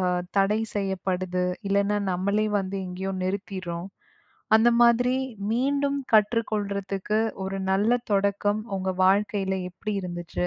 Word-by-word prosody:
அ - - 0 0.4
தடை 205 +3 +3
செய்யப்படுது. 185 -2 -1 0.2
இல்லன்னா, 200 +1 +2
நம்மளே 200 +4 +1
வந்து 195 0 -3
எங்கேயோ 190 +2 -4
நிறுத்திட்றோம். 185 -2 -4 0.7
அந்த 225 +2 +5
மாதிரி 245 +2 +4 0.4
மீண்டும் 280 +3 +1 0.2
கற்றுக் 220 +2 +3
கொள்றதுக்கு 200 0 -1 0.2
ஒரு 195 +1 -3 0.2
நல்ல 215 +6 +3
தொடக்கம் 200 +1 +1
உங்க 190 0 -1
வாழ்க்கையில 195 0 +2
எப்பிடி 205 +3 -5
இருந்துச்சு? 175 0 -3
200 Hz, 115 wpm, -26 LUFS, 190-215 Hz, 0.7 s, அந்த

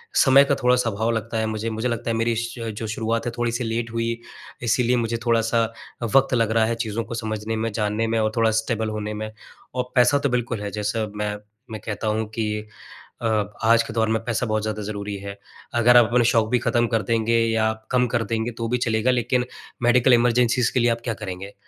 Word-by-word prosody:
समय 135 0 +7
का 140 - +1
थोड़ा-सा 125 -2 +2
आभाव 110 +2 -1
लगता 115 0 -2
है 110 - 0
मुझे। 110 +1 -3
मुझे 110 +2 -2
लगता 120 0 -3
है 115 - 0
मेरी 115 0 +1
श 115 0 -4
जो 110 - -4
शुरुआत 115 +1 -2
है 120 - -1
थोड़ी 120 0 0
सी 120 +2 -2
लेट 115 0 -2
हुई, 115 0 -2 0.4
इसीलिए 120 +1 +2
मुझे 115 0 -1
थोड़ा-सा 115 0 +2 0.5
वक़्त 135 -1 +4
लग 115 -3 +2
रहा 110 0 +3
है 115 +1 -1
चीज़ों 115 -1 -3
को - - -7
समझने 110 -1 -3
में, 110 +1 -2
जानने 105 +1 -1
में 115 0 0
और 110 0 +1
थोड़ा 115 -1 +3
स्टेबल 110 0 -1
होने 105 0 -4
में। 110 0 -5 0.4
और 125 -1 -3
पैसा 125 +3 +5
तो 140 -1 0
बिल्कुल 120 -3 -1
है 100 - -4
जैसा 105 +2 -1
मैं, 105 0 -2 0.4
मैं 110 -2 -6
कहता 110 0 -3
हूँ 110 +1 0
कि 105 -1 -2 0.5
अ, 115 - 0 0.4
आज 115 +1 +5
के 115 -1 -8
दौर 110 -1 +1
में 110 0 0
पैसा 120 +1 -1
बहुत 110 -2 0
ज़्यादा 110 0 -3
ज़रूरी 100 0 -4
है। 100 0 -8 0.4
अगर 120 +1 +5
आप 120 - +7
अपने 120 0 +4
शौक़ 115 -2 +3
भी 125 - +2
खत्म 120 0 +1
कर 115 -1 +1
देंगे 115 +2 +1
या 110 -1 +2 0.2
कम 125 -1 +3
कर 115 -1 0
देंगे 115 +2 -2
तो 115 -1 -2
भी 125 - +1
चलेगा 115 +1 +1
लेकिन 125 0 +1 0.4
मेडिकल 125 +1 +5
इमरजेंसीज़ 120 0 +3
के 125 - +2
लिए 120 - +3
आप 115 0 -2
क्या 115 - -1
करेंगे? 100 -2 -7
115 Hz, 225 wpm, -23 LUFS, 110-120 Hz, 0.5 s, समय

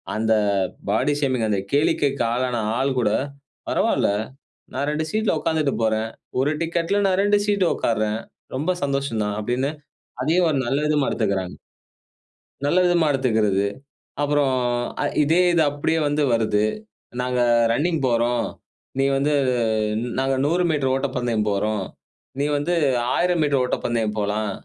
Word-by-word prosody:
அந்த 110 +1 +2 0.6
body 145 - +2
shaming 130 -5 +1
அந்த 100 - +1
கேளிக்கைக்கு 140 -2 +1
ஆளான 125 -1 -1 0.2
ஆள் 135 +1 +1
கூட 105 -3 +2 0.6
"பரவால்ல - - +2 0.7
நான் 140 +2 -1
2 155 +1 -1
சீட்ல 215 -6 +1
உட்கார்ந்துட்டு 155 -4 0
போறேன். 110 0 0 0.3
1 145 +3 +1
டிக்கெட்டில 170 +4 0
நான் 190 0 +1
2 205 0 +3
சீட் 200 -2 +2
உட்காருறேன். 110 -1 -1 0.4
ரொம்ப 155 +7 0
சந்தோஷம் 140 -5 -1
தான்." 105 0 -2
அப்டின்னு 125 +6 -1 0.5
அதையும் 165 +5 +2
ஒரு 145 - 0
நல்ல 135 +4 0
விதமா 150 -2 +1
எடுத்துக்கறாங்க. 100 -4 -1 1.1
நல்ல 145 +5 +2
விதமா 175 -3 +3
எடுத்துக்கிறது. 110 -7 +1 0.6
அப்புறம் 145 -2 +2 0.5
அ - - +1 0.2
இதே 160 +4 +3
இது 170 - +3
அப்டியே 145 +3 -1
வந்து 145 +1 +1
வருது. 110 -2 +1 0.6
"நாங்க 125 0 -1 0.3
ரன்னிங் 160 +6 0
போறோம். 120 0 +1 0.5
நீ 135 - +3
வந்து 145 +2 +1 0.9
நாங்க 135 0 +1
100 175 +4 +2
மீட்டர் 140 -4 +1
ஓட்டப்பந்தயம் 120 -5 -1
போறோம். 105 0 -1 0.6
நீ 140 - +1
வந்து 150 +5 -1 0.4
1,000 175 -2 +1
மீட்டர் 145 -3 +2
ஓட்டப்பந்தயம் 115 -3 -1
போலாம். 105 0 -1
135 Hz, 135 wpm, -22 LUFS, 110-150 Hz, 1.1 s, 2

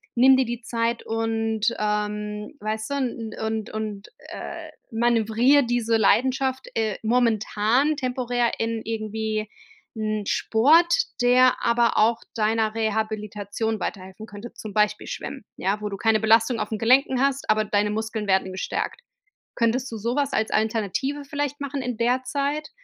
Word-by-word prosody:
nimm 260 +2 +6
dir 260 - +2
die 240 +1 -4
Zeit“ 230 0 -1
und 225 0 -1
,ähm, 210 +2 -2
weißt 220 +3 -3
du, - - 0 0.5
und 220 0 -3
und, 215 -2 -5 0.2
äh, - - -7 0.2
manövriere 235 +4 +3
diese 230 -1 +1
Leidenschaft, 260 +4 +2
äh, 220 -3 0
momentan, 230 +4 +2
temporär 245 -3 0
in 225 0 -1
irgendwie 215 -1 -3 0.5
'n 215 -1 -2
Sport, 315 +10 +4 0.3
der 250 +1 +5
aber 235 0 +3
auch 230 +2 +3 0.2
deiner 220 0 +1
Rehabilitation 215 -1 -2
weiterhelfen 190 +3 -6
könnte, 205 +2 -10
zum 215 -2 -8
Beispiel 210 0 +1
Schwimmen, 270 -7 -6
ja? 195 +3 -1
Wo 210 - -2
du 200 - -5
keine 220 0 +2
Belastung 225 +2 +4
auf - - -1
den 220 - -2
Gelenken 255 +2 +3
hast, 275 -2 0
aber 215 0 +3
deine 210 0 +1
Muskeln 220 0 -3
werden 190 -1 +2
gestärkt. 190 - -3 0.6
Könntest 245 +2 +1
du 225 - -5
sowas 255 +6 -1
als 220 - 0
Alternative 225 +6 -1
vielleicht 285 0 -3
machen 280 -1 -3
in 250 -2 -3
der 250 +2 +1
Zeit? 285 +3 -2
225 Hz, 145 wpm, -24 LUFS, 215-250 Hz, 0.6 s, nimm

